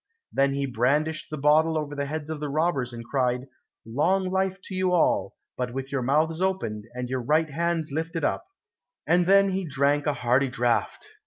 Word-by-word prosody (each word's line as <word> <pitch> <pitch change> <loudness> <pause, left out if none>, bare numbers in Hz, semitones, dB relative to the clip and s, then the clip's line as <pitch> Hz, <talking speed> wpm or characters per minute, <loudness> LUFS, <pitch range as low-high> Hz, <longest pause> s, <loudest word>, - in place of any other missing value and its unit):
Then 140 0 +2
he 140 0 -1
brandished 145 +6 0
the 155 - -5
bottle 155 +3 +3
over 150 -1 -3
the 140 -1 -3
heads 155 +1 -4
of 155 - -4
the 150 -1 -3
robbers, 145 -4 0
and 115 -1 -8
cried, 125 -1 0 0.4
"Long 185 +11 +1
life 190 0 0
to - - -8
you 185 -1 +1
all, 175 - +2 0.2
but 125 -1 -3
with 135 0 -5
your 135 -2 -1
mouths 155 +6 +1
open 115 - -1
and 125 0 -3
your 130 0 -2
right 155 +5 +1
hands 165 0 -1
lifted 165 +2 -3
up," - - 0 0.6
and 175 0 +3
then 195 0 +5
he 190 0 -1
drank 145 -1 +1
a 150 - +2
hearty 125 +2 +2
draught. 120 - -1
150 Hz, 190 wpm, -26 LUFS, 130-165 Hz, 0.6 s, then